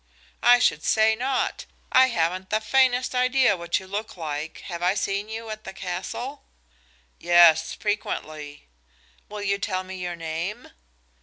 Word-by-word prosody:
"I 245 0 +7
should 155 -11 +1
say 220 0 +3
not. 255 +3 -2 0.3
I 260 0 +6
haven't 185 -3 -1
the 215 - +1
faintest 255 +2 +2
idea 255 -3 +3
what 170 -1 -1
you 190 - -12
look 205 +2 -5
like. 155 -1 -5
Have 170 -2 -7
I 180 +2 +2
seen 200 +1 -2
you 225 0 -6
at 215 0 -7
the - - -8
castle?" 190 +10 -5 0.8
"Yes, 170 -2 +5
frequently." 155 - -4 0.6
"Will 210 0 -6
you 200 0 0
tell 185 -2 -2
me 190 0 -8
your 180 -1 -4
name?" 165 +7 -5
195 Hz, 150 wpm, -25 LUFS, 175-225 Hz, 0.8 s, I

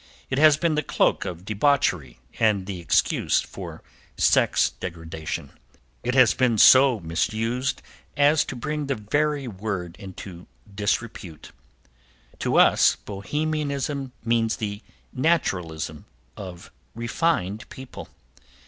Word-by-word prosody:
It 130 - +1
has 155 -1 +6
been 165 0 +1
the 150 - +1
cloak - - +1
of 90 -1 -6
debauchery 100 - +1 0.2
and 105 -4 +2
the 95 -2 -5
excuse 85 - +2
for - - -8 0.3
sex - - +3
degradation. 80 -2 -6 0.5
It 125 +1 -2
has 130 -3 +6
been 125 -3 +1
so 130 +1 +7
misused 110 - -2 0.3
as 145 +2 +4
to - - -6
bring 150 +4 -3
the 135 - 0
very 145 +6 -1
word 95 -5 -5
into 95 -3 -10 0.3
disrepute. 105 -5 -3 0.9
To - - 0
us - - +5
Bohemianism 140 +4 -3
means 115 -1 +1
the 105 -1 -5 0.3
naturalism 90 - -1 0.3
of 90 -3 -9 0.2
refined 115 - -1
people. 130 -1 -10
115 Hz, 110 wpm, -24 LUFS, 95-140 Hz, 0.9 s, so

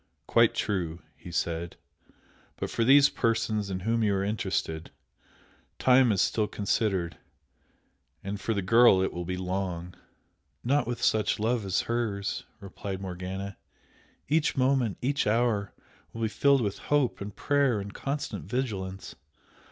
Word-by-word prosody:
"Quite - - +4
true," 90 -5 -2
he 90 - -11
said 85 0 -2 0.8
"But - - -4
for 115 - 0
these 140 +3 +7
persons 110 -5 0
in 95 -1 -3
whom 115 +4 0
you 100 -2 +2
are 95 - 0
interested, 95 -6 -2 0.9
time 130 -2 +5
is 95 -2 +3
still 110 -2 +1
considered 100 -4 -1 1.1
and 100 0 -5
for 110 +3 -1
the 100 - -1
girl 115 -1 +6
it - - -1
will 90 0 -4
be 90 +1 -3
long!" 90 -2 -3 0.7
"Not 135 0 +1
with 120 0 -3
such 110 -1 +2
love 115 0 0
as 95 -1 +1
hers!" 110 -4 -2
replied 100 0 -6
Morgana. 95 +1 -5 0.7
"Each 150 0 +1
moment, 130 -5 +2
each 140 -2 +1
hour 110 -2 +1 0.4
will 115 - -4
be 110 - +1
filled 140 +4 +3
with 100 -3 -2
hope 145 -7 +2
and 100 0 -6
prayer 140 -6 +2
and 100 +1 -7
constant 140 +1 -4
vigilance. 100 -7 -4
105 Hz, 145 wpm, -28 LUFS, 95-120 Hz, 1.1 s, these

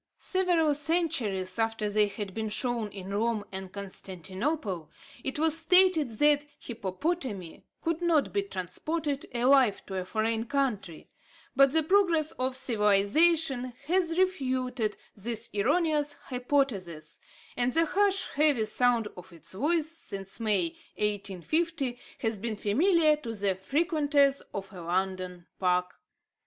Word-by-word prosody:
Several 350 -5 +2
centuries 265 - -1
after 225 -1 0
they 210 0 +3
had 200 -1 -6
been 220 +1 -3
shown 230 0 0
in 195 -1 -8
Rome 215 0 0
and 190 -1 -6
Constantinople, 190 - -4 0.3
it 265 - -2
was 315 0 +3
stated 350 -3 +4
that 295 +1 +3
hippopotami 220 - -4 0.2
could 335 +1 -1
not 330 -4 +2
be 405 - +2
transported 290 - -3
alive 250 -2 +3
to 190 -1 -3
a - - -7
foreign 225 +3 -1
country; 235 - -2 0.5
but 275 0 +6
the 320 +1 +3
progress 335 -3 +3
of 255 0 0
civilisation 250 +5 +2
has 340 0 +1
refuted 255 - 0 0.2
this 225 +2 -3
erroneous 295 - +1
hypothesis, 245 - -2 0.4
and 245 0 0
the 330 0 +4
harsh, 395 +3 +2
heavy 285 -6 +3
sound 235 0 +2
of 180 +1 -12
its 165 -1 -9
voice, 305 - +1
since 200 - -5
May, 205 -6 +1 0.3
1850, 240 - -1 0.2
has 225 -3 -1
been 225 +1 -3
familiar 305 - +3
to 230 -6 -6
the 200 -2 0
frequenters 285 - +2
of 195 0 -6
a 180 - -8
London 180 0 -2
park. 180 -1 +1
245 Hz, 125 wpm, -29 LUFS, 200-305 Hz, 0.5 s, but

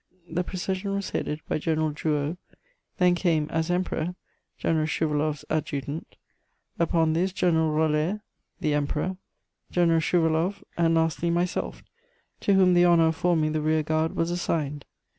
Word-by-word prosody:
The 170 +2 -1
procession 190 +2 -3
was 200 -1 -3
headed 150 +1 -2
by - - -1
General 155 0 0
Drouot; 150 +1 -1 0.6
then 180 -1 +4
came, 165 -4 +1
as 160 +1 -1
Emperor, 180 -1 -1 0.4
General 155 -2 +1
Schouwaloff's 150 -2 -1
Adjutant; 150 -1 -3 0.6
upon 165 -1 +2
this 180 +4 +1
General 165 -4 +2
Roller, 155 +6 +1 0.4
the 150 - +1
Emperor, 150 +5 -1 0.5
General 170 -2 +3
Schouwaloff, 165 +3 +1
and 165 -1 +2
lastly, 165 +1 +1
myself, 175 +1 -1 0.6
to 200 - +2
whom 185 -1 +5
the 175 0 +5
honour 170 -2 +5
of 160 - -2
forming 160 -3 +1
the 155 0 -1
rear 155 0 +2
guard 155 +1 0
was 165 +1 0
assigned. 150 -5 -2
160 Hz, 140 wpm, -26 LUFS, 155-175 Hz, 0.6 s, whom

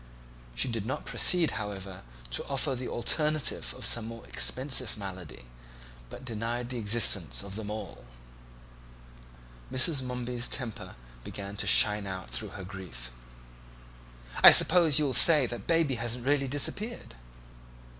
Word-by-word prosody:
She - - 0
did 115 -3 -4
not 130 - -5
proceed, 175 -3 +2
however, 95 -2 -8 0.3
to - - -1
offer 135 - 0
the 125 0 -5
alternative 150 - -1
of - - -5
some 115 -2 +2
more 115 0 -10
expensive 130 -3 -1
malady, 90 - -9 0.6
but 130 - -11
denied 120 +1 -4
the 125 - -4
existence 105 -5 +1
of 100 -1 -9
them 105 -1 -6
all. 105 +1 -7 1.7
Mrs. 135 +2 +2
Momeby's 125 -1 -3
temper 120 -5 -5 0.3
began 100 +6 -8
to - - -3
shine 105 -1 +4
out 95 -8 -7
through - - -6
her 95 - -8
grief. 90 -11 -8 1.3
"I - - +12
suppose 165 -5 +5
you'll 145 -4 +1
say 150 +5 +7
next 125 - -2
that 120 -4 -8
Baby 165 -4 +2
hasn't 120 0 -3
really 140 0 +1
disappeared." 200 - -1
120 Hz, 135 wpm, -28 LUFS, 100-130 Hz, 1.7 s, I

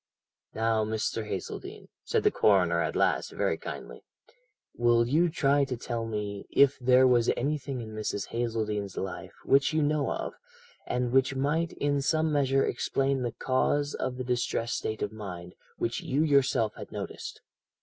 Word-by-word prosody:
"'Now, 110 0 +1
Mr. 110 0 -2
Hazeldene,' 380 - -6
said 450 -2 0
the 420 - +4
coroner - - +3
at - - -2
last - - +1
very - - 0
kindly, - - -8 0.7
'will 120 0 +3
you 165 +7 +3
try 145 -3 +2
to 130 -2 -4
tell 115 -1 -3
me 105 -2 -4
if 140 0 +4
there 130 +1 +5
was 120 -2 +4
anything 140 -1 -2
in 110 -1 -8
Mrs. 105 -2 -3
Hazeldene's 110 -4 -2
life 95 - -5
which 140 +3 +4
you 155 -1 +2
know 145 -1 +1
of, - - -3 0.5
and 125 -1 -1
which 135 +1 +3
might 150 +5 0
in 145 -1 0
some 155 +2 +1
measure 135 -2 +2
explain 135 -1 0
the 120 -2 -2
cause 145 +3 0
of 125 - -3
the 130 - -3
distressed 120 -1 -1
state 110 0 -3
of 105 - -2
mind, 90 -5 -8 0.2
which 115 - -2
you 140 +4 +1
yourself 130 -7 +2
had - - -10
noticed? - - -6
125 Hz, 160 wpm, -28 LUFS, 115-145 Hz, 0.7 s, there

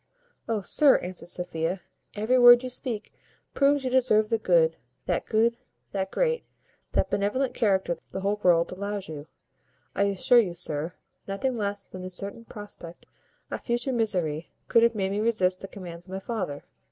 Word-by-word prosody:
"Oh! 220 -2 0
sir," 280 - +5
answered 180 -1 -7
Sophia, 175 0 -3 0.3
"every 220 +5 +2
word 245 0 +9
you 255 - -3
speak 240 -4 -3 0.4
proves 280 -1 +3
you 255 - -1
deserve 225 -5 +3
that 225 -1 0
good, 165 -2 +4 1.1
that 190 +10 -3
great, 480 -1 +1 0.5
that - - +1
benevolent 240 +7 0
character 190 -5 +1 0.2
the 190 - -4
whole 205 +2 0
world 170 -2 +4
allows 200 +1 -4
you. 150 -1 -8 0.7
I 200 - +2
assure 200 +5 +4
you, 185 -7 0
sir, 160 0 -3 0.3
nothing 200 +6 -1
less 205 -2 -2
than 185 - -9
the 185 - -5
certain 200 +5 -6
prospect 205 -6 -10 0.5
of - - -4
future 240 +2 -1
misery 180 -9 -1 0.2
could 230 - +5
have 235 0 +4
made 195 -2 -1
me 200 - -1
resist 200 -5 +1
the 195 - -6
commands 175 -3 -9
of 185 - -9
my 190 - -3
father." 190 -9 -4
200 Hz, 165 wpm, -27 LUFS, 180-230 Hz, 1.1 s, word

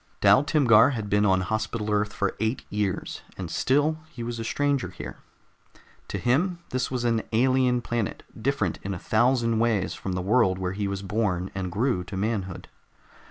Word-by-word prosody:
Dal 135 - +6
Timgar 130 -5 +5
had 110 -4 -4
been 105 +1 +3
on 95 -1 +3
Hospital 110 +1 -2
Earth 105 0 +1
for 100 -1 -1
eight 110 +4 -1
years, 105 -2 -2 0.2
and 90 -3 -5
still 145 - +2
he 125 -7 -7
was 115 0 -4
a - - -3
stranger 140 +3 0
here. - - -8 0.9
To - - -3
him 170 +9 +1
this 130 0 -1
was 125 -2 -2
an 115 -2 +2
alien 125 +1 +3
planet, 120 -3 -3
different 110 - -1
in 100 0 -4
a - - -5
thousand 115 +3 +2
ways 115 -5 +1
from 95 - -5
the 90 0 -2
world 95 -2 +3
where 95 0 -2
he 100 0 -2
was 100 0 -4
born 95 -3 -1
and 95 -2 -3
grew 110 -1 0
to 95 - -6
manhood. 95 -3 -2
110 Hz, 180 wpm, -26 LUFS, 100-125 Hz, 0.9 s, Dal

